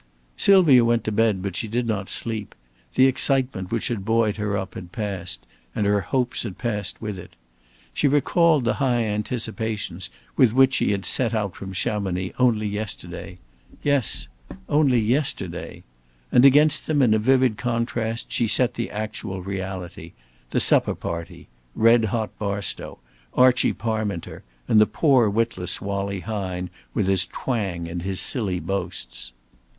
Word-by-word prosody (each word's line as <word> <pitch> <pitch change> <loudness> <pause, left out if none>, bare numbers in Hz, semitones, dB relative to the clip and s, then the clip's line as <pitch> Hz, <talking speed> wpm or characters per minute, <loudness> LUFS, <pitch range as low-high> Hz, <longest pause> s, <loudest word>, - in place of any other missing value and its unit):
Sylvia 170 -11 +6
went 115 0 +2
to 110 - -2
bed, 105 -3 +1
but 100 -3 -4
she 115 - -2
did 120 +3 -1
not 105 -4 -2
sleep. 110 -3 -1 0.4
The 130 - +6
excitement 130 -7 +1
which 115 -1 -1
had 115 -5 -3
buoyed 110 0 +1
her 105 -1 -1
up 95 -2 -5
had 90 -1 -9
passed; 95 -5 -4 0.3
and 105 - 0
her 100 0 +2
hopes 125 +6 -1
had 105 -6 -6
passed 105 -5 -2
with 105 -4 -5
it. - - -13 0.6
She 145 - +2
recalled 150 0 +3
the 115 - +2
high 125 -3 +2
anticipations 105 -3 -3 0.3
with 120 -4 +4
which 130 +1 +5
she - - +1
had 100 -1 -1
set 120 -3 +2
out 100 -4 -2
from 95 -1 -8
Chamonix 95 -1 -2
only 115 -4 +3
yesterday 95 -3 -6 0.5
yes, 115 - +1 0.4
only 140 -5 +3
yesterday. 125 +7 -1 0.5
And 125 - +6
against 150 +3 +5
them 145 -3 +2
in 115 -4 +4
a 110 - +3
vivid 130 -1 +2
contrast 115 -1 -2
she 115 - +1
set 125 +3 +2
the 115 - -4
actual 105 -3 -5
reality, 95 -2 -6 0.4
the - - 0
supper - - +3
party, 85 0 -6 0.3
Red 115 0 +5
hot 110 -1 -2
Barstow, 100 -2 -3 0.4
Archie 125 -1 +4
Parminter, 110 -6 -3 0.3
and 110 - +5
the 105 - +5
poor 130 -8 +3
witless 100 -4 -1
Wallie 100 -1 -3
Hine, 95 -4 -4 0.2
with 105 - +1
his 95 -2 +1
twang 95 -10 -3
and 85 +1 -5
his 95 +1 -2
silly 100 -8 +1
boasts. 90 -7 -4
110 Hz, 155 wpm, -23 LUFS, 95-120 Hz, 0.6 s, Sylvia